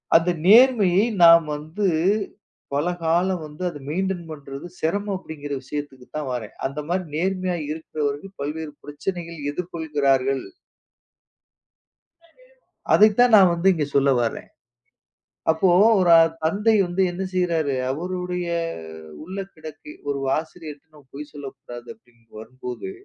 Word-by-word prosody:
அந்த 165 +2 +5 0.2
நேர்மையை 210 -3 +6 0.2
நாம் 165 -1 +8
வந்து 155 +8 -4 0.9
பல 145 +5 0 0.2
காலம் 175 +1 +1
வந்து 150 +4 -9
அதை 145 - -9
மெயின்டைன் 185 +1 -2
பண்றது 140 -1 -8
சிரமம் 200 +5 -1
அப்படின்கிற 150 -5 -9
விஷயத்துக்கு 135 -2 -7
தான் 150 -3 -3
வரேன். 115 -4 -5
அந்த 140 +2 -3
மாதிரி 185 +1 0
நேர்மையாக 185 -3 -1
இருக்கிறவர்கள் 155 +3 -4
பல்வேறு 150 +2 -4
பிரச்சனைகள் 170 +2 -5
எதிர்கொள்கிறார்கள். 145 -5 0 2.5
அதைத்தான் 220 +3 +5
நான் 185 -3 +6
வந்து 170 +2 0
இங்கே 155 -4 -1
சொல்ல 140 0 +4
வரேன். 115 - -4 1.0
அப்போ 160 +4 +2 0.3
ஒரு 175 -2 +4 0.3
தந்தை 210 +7 +2
வந்து 175 +2 0
என்ன 180 +2 -5
செய்றாரு? 165 -6 0 0.2
அவருடைய 180 +3 -3 0.8
உள்ளக்கிடக்கு. 160 -6 -9 0.2
ஒரு 140 -1 -1 0.2
ஆசிரியரிடம் 155 -2 -10
பொய் 145 +2 -8
சொல்லக் 140 -2 -9
கூடாது 120 0 -10
அப்படி 170 - -30
என்று 115 -2 -20
வரும்போது 125 - -7
160 Hz, 115 wpm, -23 LUFS, 145-185 Hz, 2.5 s, நாம்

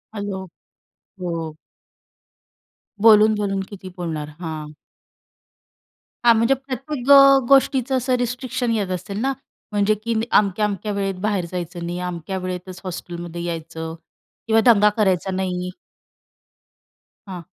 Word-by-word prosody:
Hello, 205 -2 -4 0.8
हो. 165 -3 -4 1.5
बोलून-बोलून 210 -2 +5
किती 190 -2 -9
बोलणार? 160 -4 -4
हां. 155 -3 -6 1.5
हां, 235 - +8
म्हणजे 230 +4 +3
प्रत्येक 270 0 -5
अ, 275 -1 +9
गोष्टीचं 265 -1 +3
असं 255 0 +1
रिस्ट्रिक्शन 245 0 -2
येत 205 -4 -1
असेल 195 +3 -4
ना 270 +2 +1 0.4
म्हणजे 205 0 +2
की 230 - -1 0.2
अमक्या-अमक्या 210 +1 +1
वेळेत 195 -1 -2
बाहेर 205 -4 0
जायचं 175 -1 -5
नाही. 175 +1 -4
अमक्या 180 +1 -4
वेळेतच 185 0 -6
हॉस्टेलमध्ये 175 -2 -6
यायचं 165 -1 -5 0.5
किंवा 225 0 +4
दंगा 210 -1 +5
करायचा 190 -3 +1
नाही. 180 -1 -2 1.6
हां. 180 -3 -7
195 Hz, 110 wpm, -22 LUFS, 175-225 Hz, 1.6 s, अ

